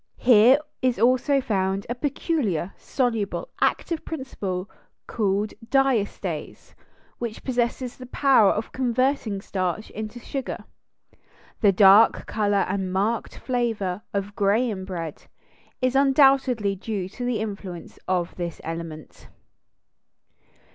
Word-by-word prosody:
Here 245 +2 +6 0.2
is 255 -2 +1
also 255 +5 +3
found 195 -4 -1
a 240 - -2
peculiar, 250 - -1
soluble, 240 - -2
active 335 -2 0
principle 200 - -4 0.4
called 205 -1 -1
diastase, 255 -4 -1 0.5
which 235 -2 -5
possesses 245 0 -1
the 255 - -10
power 260 -6 +4
of 215 - -2
converting 255 -4 0
starch 185 +2 -3
into 215 +2 -6
sugar. 270 +2 -5 1.0
The 205 -4 +5
dark 195 +3 +6
color 205 -2 +1
and 190 -1 -2
marked 205 +5 -1
flavor 225 -7 -2
of 200 +1 -3
Graham 205 -1 +1
bread 165 -5 -6 0.6
is 255 0 +2
undoubtedly 270 -6 +4
due 195 -1 -4
to 245 - -7
the 245 -2 0
influence 195 -5 -6
of 180 -2 0
this 170 -2 -4
element. 165 -1 -7
215 Hz, 110 wpm, -24 LUFS, 195-255 Hz, 1.0 s, Here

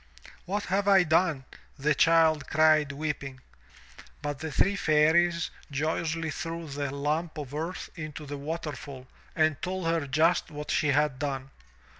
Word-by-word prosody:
"What 205 +3 -2
have 195 +2 0
I 195 -2 +6
done? 160 -4 +2 0.3
the 150 +2 +2
child 160 0 +3
cried 155 -1 +4
weeping. 140 -2 -4 0.8
But 145 -2 -3
the 160 -1 -5
three 195 +9 +2
Fairies 165 +1 +3 0.2
joyously 160 +2 -1
threw 165 +1 -5
the 140 0 -3
lump 150 +4 -2
of 145 -3 -6
earth 165 +5 -4
into 155 -2 -7
the 145 0 -5
waterfall 145 -3 -6 0.3
and 155 -2 +2
told 185 -1 -3
her 165 -3 0
just 160 +7 +2
what 150 -1 -6
she 150 - +2
had 145 -2 +2
done. 135 -2 -3
155 Hz, 145 wpm, -28 LUFS, 145-165 Hz, 0.8 s, I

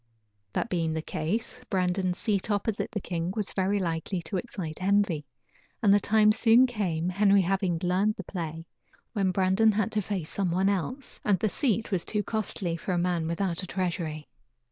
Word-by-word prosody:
That - - 0
being 165 -6 0
the 160 0 -3
case, 165 +11 -3
Brandon's 185 -1 0
seat 205 -2 -1
opposite 205 +1 -1
the 210 - -3
king 175 -2 -3
was 210 -3 -1
very 195 +1 +1
likely 175 0 -2
to 175 +4 -3
excite 180 -7 -5
envy, 190 -6 +1 0.5
and 205 -3 +5
the 205 - +6
time 215 +1 +4
soon 230 +3 +5
came, 180 -9 -1
Henry 200 +1 +4
having 190 -1 0
learned 190 +4 +2
the - - -7
play, 165 -3 -5 0.5
when 195 -4 +1
Brandon 190 +4 +3
had 215 +2 0
to 215 -2 +1
face 190 -5 -4
someone 190 0 +1
else, 220 - -3
and 205 -2 +3
the 215 +4 0
seat 230 -2 0
was 185 -4 +2
too 210 -1 -1
costly 195 -5 -2
for 185 +3 -3
a - - +1
man 175 -2 0
without 170 +1 -1
a 185 - -6
treasury. 170 -5 -3
190 Hz, 180 wpm, -28 LUFS, 175-210 Hz, 0.5 s, the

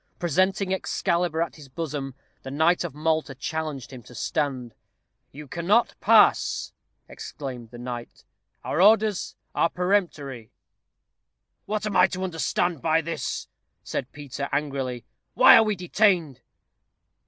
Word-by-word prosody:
Presenting 185 +3 +1
Excalibur 170 -3 0
at 170 - -8
his 145 -3 -13
bosom, 135 -2 -5 0.3
the - - -8
knight 160 +5 +2
of - - -6
Malta 155 -2 -1
challenged 150 -2 -4
him 125 - -9
to 120 - -15
stand. 130 -4 -2 0.6
"You 150 +1 -10
cannot 180 - +2
pass," - - +4 0.3
exclaimed 125 -5 -8
the 120 - -11
knight; 120 -1 -7 0.4
"our 160 - 0
orders 215 -1 +3 0.2
are 170 - +2
peremptory." 165 - -1 1.2
"What 215 0 -2
am 210 -2 -3
I 180 0 +6
to 185 0 -5
understand 175 -2 -1
by 160 0 +2
this?" 165 -1 -4 0.4
said 125 - -4
Peter, 140 -1 -6
angrily. 135 -4 -2 0.3
"Why - - +9
are - - +8
we 215 -1 0
detained?" 180 - +1
160 Hz, 130 wpm, -25 LUFS, 135-180 Hz, 1.2 s, Why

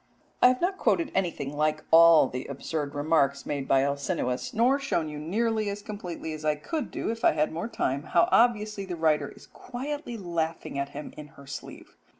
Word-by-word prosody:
I - - +9
have 250 0 +2
not 380 +2 0
quoted 335 -4 +1
anything 165 -7 -2
like 155 +1 0
all 165 -3 +8
the 125 +1 -6
absurd 145 +1 -4
remarks 145 -2 +1
made 140 -2 -3
by 135 0 +4
Alcinous, 140 -3 -2
nor 250 +5 +3
shown 170 - -1
you 150 -1 -6
nearly 215 +6 0
as 200 0 -5
completely 180 -6 -6
as 155 0 -8
I 150 -1 +2
could 290 - -4
do - - -3
if 230 0 -7
I - - +5
had 150 - +1
more 170 +7 -3
time 140 - -1
how 170 +3 +2
obviously 215 -4 +3
the 185 -2 -5
writer 160 -2 +1
is - - -15
quietly 270 0 -6
laughing 165 -6 -3
at 140 0 -2
him 145 +1 -8
in 150 - -8
her 140 - -13
sleeve. 140 +1 -9
165 Hz, 195 wpm, -27 LUFS, 145-220 Hz, -, I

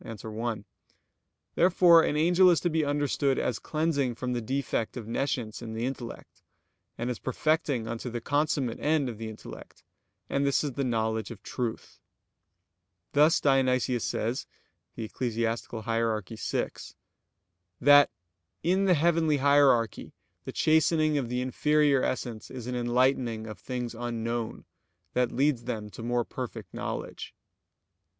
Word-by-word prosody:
1); 110 0 -5 0.9
therefore 175 -1 +6
an 150 - 0
angel 175 +4 +5
is 170 - +4
to 175 - -1
be 160 0 +1
understood 145 -1 +1
as 120 - -1
cleansing 155 -6 -1
from 125 +1 -3
the 120 - -1
defect 130 -1 -2
of 115 -3 -7
nescience 120 -2 -2
in 115 -2 -6
the 115 +2 -2
intellect; 125 -3 -7 0.6
and 120 +2 -2
as 120 - -5
perfecting 135 -3 0
unto 115 +2 -4
the 120 0 -4
consummate 145 -2 0
end 150 -2 +1
of 115 -3 -6
the 110 -1 -5
intellect, 110 - -11 0.4
and 140 - 0
this 140 +1 +2
is 145 - -2
the 140 +2 -2
knowledge 110 -3 -1
of 110 -5 -10
truth. 120 -3 -5 1.1
Thus 150 +3 +5
Dionysius 130 -3 +2
says 115 +4 -2 0.5
(Eccl. 115 0 -3
Hier. 115 -1 0
vi): 110 - -2 1.1
that 145 +2 +7 0.5
"in 185 +3 +2
the 185 -2 +5
heavenly 160 -1 +2
hierarchy 140 -4 +3 0.3
the - - -4
chastening 155 -1 +3
of 125 -4 -4
the 125 +1 -1
inferior 145 +2 +2
essence 120 -4 -3
is 125 -3 -7
an 125 - -4
enlightening 120 -2 +1
of 110 -1 -8
things 125 -2 -4
unknown, 115 -1 -4 0.5
that 125 -1 +1
leads 135 -3 +1
them 110 -4 -4
to 95 - -9
more 120 0 0
perfect 115 -7 -7
knowledge." - - -5
125 Hz, 140 wpm, -28 LUFS, 115-145 Hz, 1.1 s, that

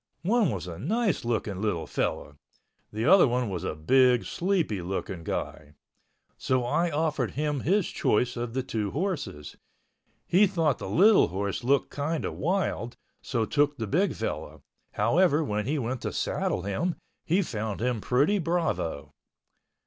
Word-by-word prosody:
One 215 0 +3
was 100 -7 -4
a 85 -2 -7
nice 205 - 0
looking 110 -5 -2
little 100 -7 -1
fellow—the 105 +8 -5
other 185 0 +7
one 125 -3 -1
was 90 -3 -4
a - - -3
big, 125 +9 +3
sleepy 170 - -1
looking 90 -1 -4
guy. 75 -1 -5 0.6
So 130 -2 0
I 170 +8 +1
offered 155 -1 -1
him 150 -1 0
his 190 +7 +1
choice 125 +4 0
of 120 0 -4
the 130 - 0
two 110 -5 -2
horses. 140 - -4 0.7
He 200 +4 +4
thought 165 -7 0
the - - -5
little 205 +5 +5
horse 100 +6 -3
looked 135 +2 +2
kind 150 +3 -2
of - - -3
wild, 170 -8 -2 0.2
so 115 -3 -1
took 145 +3 +1
the 110 - -3
big 180 - +1
fellow. - - -5 0.3
However, 155 - +3
when 105 -5 -2
he 150 +3 0
went 125 -1 -3
to - - -3
saddle 90 - -1
him 100 - -1 0.3
he 185 +5 +2
found 110 - -4
him 120 -1 -1
pretty 145 - +2
bravo. 135 - -2
130 Hz, 155 wpm, -27 LUFS, 105-165 Hz, 0.7 s, other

